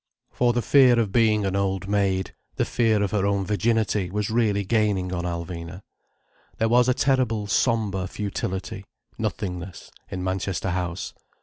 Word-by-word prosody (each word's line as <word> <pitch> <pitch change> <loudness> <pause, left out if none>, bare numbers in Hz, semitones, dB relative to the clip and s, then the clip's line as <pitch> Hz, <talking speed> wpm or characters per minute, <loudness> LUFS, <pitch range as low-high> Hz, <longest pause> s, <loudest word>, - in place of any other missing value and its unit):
For 120 -1 +2
the 120 0 -1
fear 130 0 +6
of 110 -4 0
being 110 -2 +3
an 95 0 -1
old 100 0 -1
maid, 100 -2 0 0.2
the - - 0
fear 110 -3 +2
of 100 - -1
her 105 -3 0
own 100 -1 +1
virginity 105 -2 0
was 105 +2 -2
really 110 -3 +1
gaining 100 -4 +1
on 85 -1 -2
Alvina. 85 +1 -5 0.8
There 115 - +1
was 125 +1 +4
a 125 - +3
terrible 125 -6 +1
sombre 105 -3 0
futility, 95 -1 -4 0.4
nothingness, 90 -2 -4 0.2
in 90 -1 -4
Manchester 95 0 -2
House. 90 -1 -3
100 Hz, 150 wpm, -24 LUFS, 95-110 Hz, 0.8 s, fear